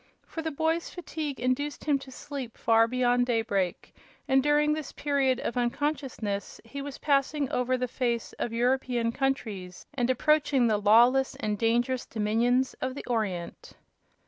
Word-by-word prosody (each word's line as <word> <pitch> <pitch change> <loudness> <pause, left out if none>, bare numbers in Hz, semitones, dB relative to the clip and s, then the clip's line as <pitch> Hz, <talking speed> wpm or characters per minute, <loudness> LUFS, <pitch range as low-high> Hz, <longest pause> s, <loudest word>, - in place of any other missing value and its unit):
For 325 - -6
the 320 - -2
boy's 320 +3 -1
fatigue 310 -5 -5
induced 255 +4 -1
him 290 -2 +2
to 270 - -11
sleep 265 -2 -7
far 225 0 +4
beyond 245 0 +2
daybreak, 205 -6 -1 0.3
and 265 -1 +4
during 295 +1 +3
this 310 -2 -4
period 275 -3 +1
of 240 - -3
unconsciousness 245 -5 -2
he 280 +5 -7
was 280 -1 -6
passing 280 0 +1
over 250 +1 +1
the 250 0 -1
face 235 -2 -2
of 235 - -2
European 245 0 +1
countries 220 -9 -3
and 250 -3 0
approaching 290 0 +3
the 220 -2 +3
lawless 240 +6 +5
and 210 -1 -2
dangerous 240 +4 0
dominions 235 +4 +1
of 260 0 -2
the - - -7
Orient. 205 -8 -3
255 Hz, 150 wpm, -28 LUFS, 230-280 Hz, 0.3 s, lawless